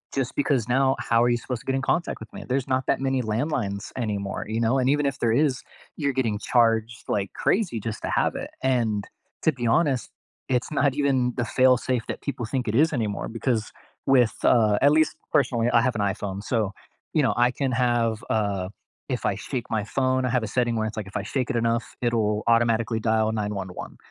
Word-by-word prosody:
just 135 -2 -1
because 135 -5 +1
now, 135 +1 +3
how 115 0 +2
are 120 - +3
you 120 - +3
supposed 120 +1 -5
to - - -20
get 135 - 0
in 135 - 0
contact 170 +5 -1
with 110 - -10
me? - - -7
There's 130 0 0
not 130 0 0
that - - +1
many 135 -1 +1
landlines 110 -3 -2
anymore, 100 -5 -3
you 110 +1 -2
know? 120 +4 +2
And 130 0 +2
even 145 +1 +2
if 140 -1 -1
there 115 - +2
is, 135 0 +2 0.4
you're 140 -3 0
getting 115 -5 0
charged 115 -1 +1
like 100 -2 -1
crazy 185 - 0
just 110 +1 -5
to - - -2
have - - +1
it, - - -5
and, 115 -6 +1 0.4
to 160 - +4
be 125 -4 -3
honest, 135 0 +2 0.4
it's 125 +1 0
not 140 -2 +2
even 135 -4 +1
the 120 - 0
fail-safe 125 +1 +2
that - - -5
people 135 -4 -4
think 125 +2 -2
it 105 - -1
is 155 +5 +4
anymore, 110 -6 -2
because 115 -1 -1 0.4
with, 125 -4 +4
uh, 105 -3 +4
at 140 +2 +6
least 155 +1 +3 0.2
personally, 120 -3 +2
I 120 -1 +4
have 125 +1 +1
an 105 - -1
iPhone, 100 -1 -2
so, 110 -3 0 0.4
you 155 - +3
know, 135 - +2
I 120 +1 +4
can 135 0 -1
have, 120 -2 +1
uh 100 -4 0 0.4
if 125 -2 -2
I - - +2
shake 115 +4 -4
my 110 -2 0
phone, 130 +4 0
I - - 0
have 125 -1 +1
a - - -2
setting 120 +1 0
where 110 -1 0
it's 110 - -4
like, 105 -3 -5
if 95 - -5
I 100 - -3
shake 125 +4 -2
it 140 - -1
enough, 115 0 0
it'll 110 -3 0
automatically 115 -1 +2
dial 110 -1 +1
911, 105 -4 -4
120 Hz, 220 wpm, -25 LUFS, 110-130 Hz, 0.4 s, at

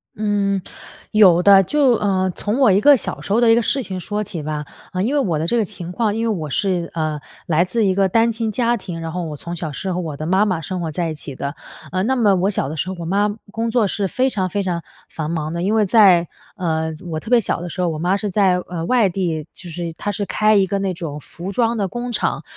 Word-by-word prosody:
嗯， 205 -2 0 0.5
有 185 -5 +6
的， 195 -1 +8
就， 280 - +3
呃， 190 -4 +1
从 215 +4 -2
我 245 -7 +6
一 195 +3 +3
个 290 +1 +7
小 - - -4
时 - - -7
候 225 - +4
的 235 -2 +5
一 - - +6
个 235 - +3
事 270 +3 0
情 185 -3 -5
说 210 +3 -3
起 175 -6 -6
吧。 150 0 -4 0.3
呃， 185 +1 -1
因 260 +6 0
为 290 - +3
我 175 - 0
的 160 - -1
这 240 - +1
个 225 - +3
情 180 -2 -7
况， 215 +1 0
因 225 - -1
为 215 - +1
我 155 -3 -5
是， 180 0 -1
呃， 155 -2 -1 0.3
来 165 +1 +3
自 215 +4 0
一 190 - +3
个 195 -1 +2
单 230 +3 +3
亲 225 -1 -2
家 240 +2 +1
庭， 180 -6 -6
然 165 0 -4
后 180 0 -3
我 155 -2 -5
从 170 +4 -7
小 160 -3 -4
是 185 +5 -3
和 180 - -2
我 155 -4 -5
的 155 - -5
妈 190 +5 +3
妈 185 -5 0
生 180 +3 -4
活 160 -2 -3
在 170 +1 -2
一 - - -5
起 140 -2 -7
的。 140 +3 -4 0.4
呃， 185 +1 0
那 260 +5 +1
么 210 -6 +4
我 185 +2 +1
小 190 - -1
的 155 - -5
时 165 +4 -3
候 190 - -4
我 165 - -5
妈 200 +4 +1 0.2
工 230 +2 -2
作 230 -2 +2
是 200 0 -1
非 260 +6 +1
常 185 -3 -1
非 200 +2 -1
常 175 -2 -2 0.3
繁 155 -1 -4
忙 160 -1 -3
的， 170 - -3
因 205 +4 +1
为 215 -2 +3
在， 185 -5 +5 0.3
呃， 160 -2 -1 0.2
我 155 - -2
特 220 - -10
别 245 - +6
小 190 -5 -2
的 175 - -5
时 185 - -8
候， 180 - +2
我 155 -2 -4
妈 180 +4 +1
是 205 0 -3
在， 190 -2 +3
呃， 170 -2 -4
外 240 -3 +3
地 170 -5 -2
就 175 - -10
是 170 0 -5
她 205 +5 -3
是 205 +1 -3
开 215 +1 +2
一 195 -1 +4
个 195 +2 -2
那 195 -1 -1
种 160 -4 -6
服 175 +6 -7
装 235 0 +1
的 200 -2 0
工 240 +3 -5
厂。 - - -1
190 Hz, 295 characters per minute, -20 LUFS, 170-215 Hz, 0.5 s, 的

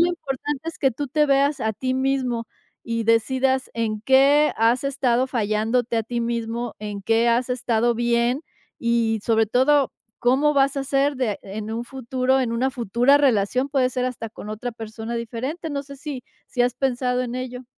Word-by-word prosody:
lo 340 - +5
importante 295 -2 -4
es 330 - -7
que 270 - +3
tú 285 +4 -4
te 300 +3 +2
veas 280 0 +2
a 220 -1 0
ti 255 +4 -2
mismo 260 -3 -1 0.3
y 230 -1 -2
decidas 260 +4 +2
en 220 -2 -2
qué 275 +5 +5
has 230 +4 +2
estado 260 -3 +1
fallándote 225 0 0
a - - 0
ti 235 +2 -3
mismo, 235 0 -3
en 205 -1 -5
qué 225 +3 +2
has 240 +2 +1
estado 240 -1 +1
bien 240 +2 +1 0.4
y 230 -2 +1
sobre 225 0 +3
todo, 265 +5 +3 0.3
cómo 270 +5 +3
vas 275 0 +3
a - - 0
hacer 275 +1 +1
de 235 -6 -1
en 210 +2 -6
un 230 +1 -3
futuro, 260 +1 0
en 245 -3 -1
una 255 +3 +1
futura 245 +2 +3
relación, 255 -1 +2
puede 265 -2 +2
ser 250 0 -1
hasta 235 -3 -5
con 210 - -10
otra 220 +3 -4
persona 225 +1 -6
diferente, 245 +8 -4
no 280 -1 -2
sé 280 0 -11
si 270 -3 -7 0.2
si 250 - -4
has 245 0 +1
pensado 250 -1 0
en 245 -1 -4
ello. 255 0 -5
250 Hz, 185 wpm, -23 LUFS, 230-270 Hz, 0.4 s, lo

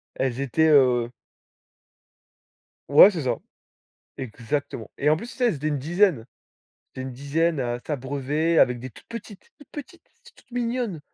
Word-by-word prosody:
Elles 130 0 -1
étaient, 150 +4 +2
heu 125 -5 +4 1.8
Ouais, 150 +8 +9
c'est 170 -5 -4
ça. 125 -3 0 0.8
Exactement. 125 -1 -4
Et 150 - +2
en 155 - +3
plus 235 - -7
tu - - -11
sais, 250 - +2
elles 215 - 0
étaient 150 +2 -3
une 145 -3 -1
dizaine. 175 - +2 0.8
Elles 130 - -4
étaient 130 - -5
une - - -7
dizaine 145 +4 0
à 120 -1 -2
s'abreuver 145 +3 -1
avec 125 -1 +4
des 130 +1 -8
toutes - - -17
petites, 220 -4 -10
toutes 290 - -18
petites, 330 +4 -10 0.3
toutes - - -23
mignonnes. 240 -7 -2
150 Hz, 160 wpm, -24 LUFS, 130-185 Hz, 1.8 s, Ouais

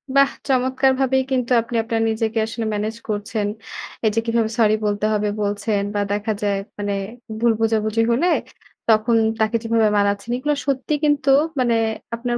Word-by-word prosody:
বাহ! 275 0 +6 0.2
চমৎকারভাবেই 265 0 +2
কিন্তু 250 -1 0
আপনি 235 +1 -7
আপনার 225 -1 -1
নিজেকে 225 0 -1
আসলে 225 0 -4
ম্যানেজ 215 +2 -2
করছেন। 210 0 -2 0.6
এই 215 - +4
যে 225 - +3
কিভাবে 230 -1 +1
সরি 215 -1 +5
বলতে 205 0 0
হবে? 210 0 0
বলছেন। 205 0 0
বা 205 - -1
দেখা 210 +2 -1
যায়, 200 -1 +1 0.2
মানে 205 -1 -2 0.5
ভুল 235 0 +4
বোঝাবুঝি 220 0 +1
হলে 280 +10 +2 0.6
তখন 225 +1 +4 0.2
তাকে 220 +1 +1
কিভাবে 225 -1 +2
মানাচ্ছেন? 200 +3 0
এগুলো 295 +3 0
সত্যি 275 +2 -1
কিন্তু 290 -2 +2 0.3
মানে 240 -2 +2 0.4
আপনার 240 +1 -2
225 Hz, 155 wpm, -21 LUFS, 210-250 Hz, 0.6 s, বাহ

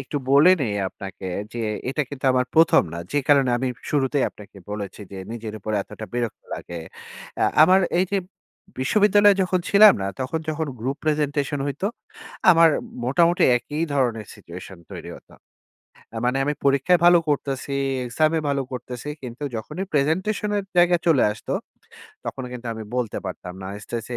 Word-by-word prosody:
একটু - - -5
বলে 145 +6 +7
নেই 110 -6 -1
আপনাকে 95 0 -10 0.3
যে 120 - -6 0.3
এটা 135 +3 0
কিন্তু 135 -1 -9
আমার 125 0 +1
প্রথম 165 0 +6
না, 85 - -5
যে 145 - +2
কারণে 140 -3 +5
আমি 130 +1 -1 0.2
শুরুতেই 140 -1 +1
আপনাকে 105 -1 -15
বলেছি 105 -2 -6
যে - - -7 0.2
নিজের 110 -2 -6
উপর 110 +1 -5
এতটা 110 - -9
বিরক্ত 120 -2 -3
লাগে। 85 -1 -7 0.6
অ্যা - - +2 0.2
আমার 185 +4 +6 0.2
এই 185 - +4
যে 200 - +3 0.6
বিশ্ববিদ্যালয়ে 205 +6 +4
যখন 185 0 0
ছিলাম 210 +1 +8
না, 95 - -1
তখন 130 +5 -2
যখন 155 +1 -1
group 135 +4 -2
presentation 145 -2 0
হইতো, 145 +7 -2 0.6
আমার 165 -1 +7 0.4
মোটামুটি 170 +7 +3
একই 150 +6 -4
ধরনের 120 -6 0
situation 90 +2 -11
তৈরি - - -8
হতো। - - -19 0.9
মানে 125 +2 +1
আমি 145 - 0
পরীক্ষায় 140 +6 +4
ভালো 175 0 +8
করতেছি, 140 -1 -2 0.3
exam 155 +6 +1
এ - - +1
ভালো 140 -1 0
করতেছি, 125 +2 -6
কিন্তু 125 +4 -7
যখনই 180 - -5
presentation 185 +9 0
এর 200 - -1
জায়গায় 175 -1 +4
চলে 155 -6 +5
আসতো, 105 - -5 0.7
তখন 130 - -5
কিন্তু 125 -1 -8
আমি 110 - -7
বলতে 120 -4 -2
পারতাম 90 -1 -7
না। - - -6 0.2
স্টেজ 115 -1 -5
140 Hz, 160 wpm, -23 LUFS, 120-165 Hz, 0.9 s, ছিলাম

